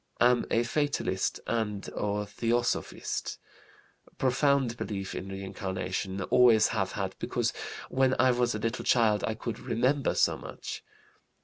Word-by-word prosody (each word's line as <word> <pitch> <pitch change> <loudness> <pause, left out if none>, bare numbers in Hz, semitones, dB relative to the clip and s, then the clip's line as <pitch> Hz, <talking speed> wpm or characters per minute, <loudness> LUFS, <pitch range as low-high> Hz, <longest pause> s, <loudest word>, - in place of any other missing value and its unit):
Am 120 0 +4
a 115 - +2
fatalist 130 -7 -1
and 105 -3 -2
a 105 0 -1
theosophist. 115 +3 -1 0.8
Profound 130 -1 +2
belief 100 -5 -4
in 95 - -5
reincarnation, 95 0 -3
always 120 -1 +5
have - - -1
had, - - -3
because - - -1 0.3
when 130 0 +2
I 130 0 +5
was 120 -2 +1
a - - -1
little 115 +2 -2
child 110 -4 +3
I 110 - -1
could 115 0 -5
'remember' 130 +4 +1
so - - +3
much. - - -7
115 Hz, 130 wpm, -29 LUFS, 105-125 Hz, 0.8 s, always